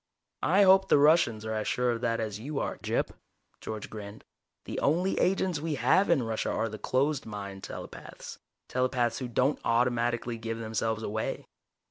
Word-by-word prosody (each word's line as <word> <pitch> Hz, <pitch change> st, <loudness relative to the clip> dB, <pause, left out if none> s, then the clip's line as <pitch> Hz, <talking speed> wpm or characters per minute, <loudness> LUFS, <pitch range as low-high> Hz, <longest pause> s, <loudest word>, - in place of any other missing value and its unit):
"I 195 Hz, +4 st, +4 dB
hope 190 Hz, 0 st, +6 dB
the -, -, +6 dB
Russians 145 Hz, -7 st, +4 dB
are 110 Hz, -, -2 dB
as 110 Hz, -1 st, -2 dB
sure 125 Hz, 0 st, +1 dB
of 115 Hz, 0 st, -3 dB
that 115 Hz, -1 st, 0 dB
as 105 Hz, -2 st, -3 dB
you 140 Hz, +5 st, -5 dB
are, -, -, -2 dB
Gyp," -, -, -1 dB, 0.5 s
George 110 Hz, -1 st, -6 dB
grinned. 105 Hz, -1 st, -9 dB, 0.4 s
"The -, -, -4 dB
only 175 Hz, +6 st, +1 dB
agents 185 Hz, -3 st, +1 dB
we 155 Hz, 0 st, -2 dB
have 140 Hz, +10 st, +3 dB
in 160 Hz, -7 st, +3 dB
Russia 115 Hz, -1 st, -2 dB
are 110 Hz, -, 0 dB
closed 140 Hz, 0 st, 0 dB
mind 100 Hz, -2 st, -7 dB
telepaths -, -, -9 dB, 0.3 s
telepaths 125 Hz, -2 st, 0 dB
who 130 Hz, -, -3 dB
don't 125 Hz, +4 st, +1 dB
automatically 120 Hz, 0 st, +1 dB
give 115 Hz, 0 st, -4 dB
themselves 110 Hz, 0 st, -2 dB
away. 110 Hz, +1 st, -3 dB
120 Hz, 165 wpm, -29 LUFS, 110-145 Hz, 0.5 s, hope